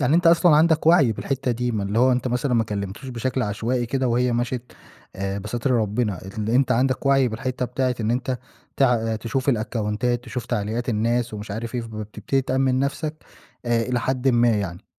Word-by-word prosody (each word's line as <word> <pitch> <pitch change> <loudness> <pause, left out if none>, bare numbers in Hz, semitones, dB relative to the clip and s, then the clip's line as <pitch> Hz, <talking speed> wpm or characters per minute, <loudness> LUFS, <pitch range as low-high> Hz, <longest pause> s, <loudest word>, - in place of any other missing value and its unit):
يعني 135 +2 +2
أنت 175 +1 +3
أصلًا 165 -2 +6
عندك 160 0 +3
وَعْي 155 -9 +6
بالحتّة 135 +3 -2
دي، 120 0 -1
ما 105 - -1
اللي 100 +3 -1
هو 130 +1 +5
أنت 125 +1 0
مثلًا 125 +1 0
ما 115 - +3
كلِّمتوش 100 +4 -5
بشكل 130 +1 -2
عشوائي 115 +4 -1
كده 130 +1 0
وهي 125 +1 +2
مَشِت 120 +1 -2 0.4
آآ 95 +1 -2
بستر 120 +6 -3
ربِّنا. 110 -3 0 0.2
اللي 110 +2 -1
أنت 130 -1 +3
عندك 130 +3 +1
وَعْي 135 -2 +4
بالحتّة 125 +3 -3
بتاعة 125 +1 -1
إن 110 0 0
أنت 125 +1 -1 0.4
تع 115 -4 +2
تشوف 130 +5 -3
الأكاونتات، 115 +1 0
تشوف 120 0 -5
تعليقات 115 +2 -2
الناس 115 +1 0
ومش 105 0 -7
عارف 115 +4 -5
إيه، 120 - 0
فبتبتدي 110 +4 -3
تأمِّن 130 0 +1
نَفْسك 140 +3 -2 0.5
آآ 120 -1 +1
إلى 125 0 -1
حدٍ 130 +2 0
ما 120 -1 +4
يعني. 100 -6 -2
120 Hz, 190 wpm, -23 LUFS, 110-130 Hz, 0.5 s, أصلًا